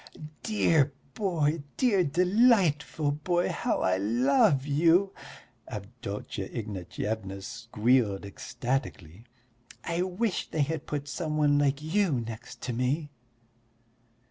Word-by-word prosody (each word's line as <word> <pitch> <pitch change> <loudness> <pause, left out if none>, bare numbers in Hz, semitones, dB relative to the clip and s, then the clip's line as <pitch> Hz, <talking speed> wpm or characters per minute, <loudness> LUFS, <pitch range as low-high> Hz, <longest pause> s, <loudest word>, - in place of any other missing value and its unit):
"Dear 160 -10 +2 0.2
boy, 165 -6 0 0.2
dear, 210 -8 +3
delightful 175 - +3
boy, 175 +4 0
how - - -1
I 95 0 +2
love 130 +6 +3
you!" 170 +7 +3 0.5
Avdotya 105 -3 -6
Ignatyevna 100 -1 -4
squealed 115 -2 0
ecstatically. 110 - -4 0.6
"I 170 +1 -1
wish 185 +3 -1
they 155 - +1
had 160 +1 -4
put 145 -1 -3
some 155 +1 -3
one 145 -1 +4
like 140 0 +1
you 180 +1 +1
next 115 -1 -5
to 125 -1 -2
me." 140 +5 -1
145 Hz, 105 wpm, -28 LUFS, 115-170 Hz, 0.6 s, one